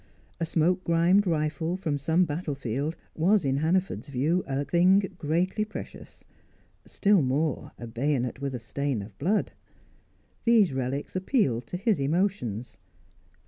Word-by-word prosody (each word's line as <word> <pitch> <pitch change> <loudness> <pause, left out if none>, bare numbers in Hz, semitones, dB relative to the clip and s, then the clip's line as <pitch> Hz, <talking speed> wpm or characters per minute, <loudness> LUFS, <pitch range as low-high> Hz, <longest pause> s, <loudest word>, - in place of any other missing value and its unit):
A 165 - -1
smoke 175 +3 +1
grimed 175 +4 +3
rifle 160 +2 -1
from 155 -6 -2
some 165 +6 +2
battlefield 145 -2 -3 0.2
was 185 +2 +3
in 135 0 +1
Hannaford's 175 +6 0
view 145 +7 0
a 140 +1 -1
thing 180 +4 +4 0.2
greatly 175 +7 0
precious; 215 - -9 0.6
still 200 -3 +3
more, 140 +2 -1
a 120 - -7
bayonet 125 +1 -1
with 135 -3 -3
stain 130 -1 -2
of 100 0 -12
blood; 200 +8 +1 0.9
these 220 - +4
relics 135 +4 -3
appealed 185 - +1
to 180 - -4
his 205 0 +1
emotions. 135 - -1
155 Hz, 130 wpm, -27 LUFS, 135-185 Hz, 0.9 s, thing